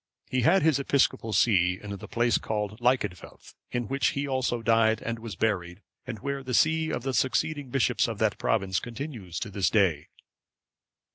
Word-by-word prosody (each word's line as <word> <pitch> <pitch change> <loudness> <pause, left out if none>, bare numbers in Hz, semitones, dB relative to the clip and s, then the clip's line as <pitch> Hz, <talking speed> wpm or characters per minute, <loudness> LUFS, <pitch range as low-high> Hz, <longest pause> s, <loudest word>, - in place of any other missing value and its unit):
He 130 - +1
had 170 +7 +4
his 155 -3 +3
episcopal 135 -5 +1
see 95 -3 +3
in 100 -1 -7
the 100 - -9
place 120 0 +1
called 105 0 -3
Lyccidfelth,(547) 120 -7 -2 0.2
in 120 -2 -3
which 135 +3 +1
he 140 +1 -1
also 130 -3 -1
died, 110 -1 +3
and 115 0 -4
was 115 -4 -7
buried, 90 -2 -2 0.2
and 120 -3 -5
where 140 +5 -4
the 125 -2 -3
see 160 +2 +3
of 120 - -3
the 135 0 -2
succeeding 140 +2 0
bishops 125 -1 +1
of 115 -2 -4
that 110 -1 0
province 95 -4 0
continues 120 - -6
to 105 - -4
this 95 -1 +1
day. 95 -9 +2
115 Hz, 180 wpm, -27 LUFS, 105-130 Hz, 0.2 s, had